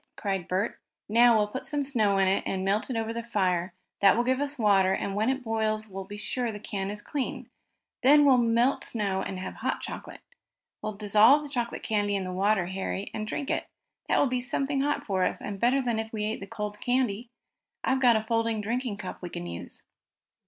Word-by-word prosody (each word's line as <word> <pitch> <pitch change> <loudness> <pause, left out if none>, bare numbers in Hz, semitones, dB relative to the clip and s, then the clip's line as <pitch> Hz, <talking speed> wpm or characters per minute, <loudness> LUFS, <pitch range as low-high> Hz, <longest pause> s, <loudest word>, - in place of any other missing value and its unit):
cried 195 -4 -2
Bert. 190 +5 -1 0.3
"Now 235 +1 +6
we'll 210 - +3
put 260 - -5
some 290 -2 -1
snow 220 -8 +2
in 195 -1 +3
it, 190 - +2
and 190 0 -2
melt 200 +5 +1
it 255 - -2
over 225 0 -2
the 235 - -3
fire. 185 -6 0 0.3
That 200 +1 +5
will 240 - +3
give 260 +1 +1
us 285 +1 -2
water, 195 -4 +4
and 195 - -2
when 215 +4 +1
it 265 0 -1
boils 220 -1 0
we'll 195 -1 -7
be 205 +1 -8
sure 240 +2 -2
the 210 - -7
can 200 -2 -4
is 205 0 -5
clean. 280 -3 -4 0.5
Then 290 +3 +6
we'll 260 -3 +6
melt 235 +3 +2
snow 200 -4 -1
and 190 - -4
have 185 - -6
hot - - -2
chocolate. - - -7 0.6
We'll 215 - -3
dissolve 215 +8 +5
the 295 - -8
chocolate 240 -4 -3
candy 205 -2 0
in 195 - -1
the 185 0 -5
water, 195 0 +2
Harry, 190 +2 -4
and 215 0 -4
drink 280 +5 -3
it. - - -1 0.4
That - - +3
will - - +4
be 250 -2 0
something 275 +2 -1
hot 290 +1 -1
for 190 -3 0
us, - - 0
and 200 -1 -6
better 260 +4 +3
than 235 -3 0
if 220 0 -4
we 215 -2 -3
ate 215 +1 -2
the 195 - -8
cold 210 0 -5
candy. 245 -3 0 0.5
I've 265 0 +1
got 245 -3 +6
a 220 - +1
folding 225 0 0
drinking 230 +1 -2
cup 190 -3 -7
we 175 - -5
can 85 - -6
use." 85 0 -8
215 Hz, 225 wpm, -28 LUFS, 195-245 Hz, 0.6 s, Now